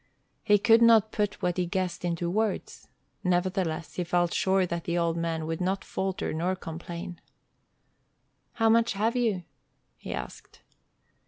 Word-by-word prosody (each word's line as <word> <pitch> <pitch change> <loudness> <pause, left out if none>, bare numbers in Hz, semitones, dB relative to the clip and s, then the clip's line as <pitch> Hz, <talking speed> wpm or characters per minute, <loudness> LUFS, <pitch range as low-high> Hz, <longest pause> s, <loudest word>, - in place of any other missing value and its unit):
He 205 - +5
could 225 +3 +5
not 225 -2 +6
put 205 -2 -2
what 180 0 0
he 180 -1 0
guessed 185 -1 -2
into 170 -1 -1
words. 210 +3 -2 0.4
Nevertheless, 180 -3 0
he 180 - 0
felt 175 0 +1
sure 190 0 +2
that 170 -1 -4
the 170 0 -1
old 170 -1 +1
man 165 -1 -2
would 165 +2 -3
not 190 +2 -1
falter 190 -1 -2
nor 175 +4 0
complain. 170 0 -7 1.3
"How 225 -1 +2
much 230 +1 +4
have 220 +4 0
you?" 220 -7 0 0.5
he - - -8
asked. - - -8
180 Hz, 150 wpm, -28 LUFS, 170-205 Hz, 1.3 s, not